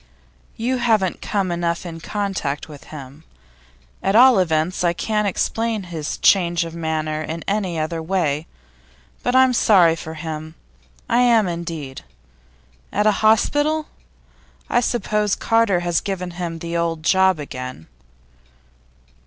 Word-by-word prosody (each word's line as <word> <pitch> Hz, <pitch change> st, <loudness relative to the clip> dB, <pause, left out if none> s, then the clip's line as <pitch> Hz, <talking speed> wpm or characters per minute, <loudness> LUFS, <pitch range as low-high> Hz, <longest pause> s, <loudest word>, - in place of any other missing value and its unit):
'You 250 Hz, +3 st, 0 dB
haven't 220 Hz, -7 st, +1 dB
come 195 Hz, -4 st, -1 dB
enough 170 Hz, 0 st, -2 dB
in 165 Hz, -1 st, -7 dB
contact 190 Hz, -7 st, -3 dB
with 150 Hz, -3 st, -12 dB
him. 145 Hz, 0 st, -11 dB, 0.8 s
At 195 Hz, -, +1 dB
all 250 Hz, -2 st, +7 dB
events, 165 Hz, 0 st, 0 dB
I 170 Hz, -1 st, +3 dB
can't 210 Hz, +3 st, -1 dB
explain 225 Hz, +2 st, -1 dB
his 165 Hz, -4 st, -5 dB
change 175 Hz, -3 st, +3 dB
of 165 Hz, -, -8 dB
manner 155 Hz, -2 st, -2 dB
in 160 Hz, +1 st, -5 dB
any 195 Hz, -4 st, -1 dB
other 160 Hz, +1 st, -2 dB
way. 160 Hz, -3 st, -1 dB, 0.7 s
But 245 Hz, -, 0 dB
I'm 260 Hz, -1 st, +5 dB
sorry 180 Hz, -8 st, +5 dB
for 160 Hz, 0 st, -8 dB
him; 155 Hz, 0 st, -6 dB, 0.5 s
I 240 Hz, 0 st, +2 dB
am, 235 Hz, -5 st, +4 dB
indeed. 165 Hz, -6 st, -5 dB, 0.9 s
At 210 Hz, -, 0 dB
a 215 Hz, -, +6 dB
hospital? 290 Hz, +8 st, +2 dB, 0.8 s
I 240 Hz, -, +4 dB
suppose 210 Hz, -4 st, 0 dB
Carter 225 Hz, -6 st, +2 dB
has 175 Hz, -2 st, 0 dB
given 185 Hz, -3 st, -4 dB
him 170 Hz, -1 st, -5 dB
the 170 Hz, +1 st, -5 dB
old 165 Hz, -2 st, -1 dB
job 190 Hz, +2 st, +4 dB
again? 130 Hz, -, -7 dB
175 Hz, 135 wpm, -21 LUFS, 160-210 Hz, 0.9 s, all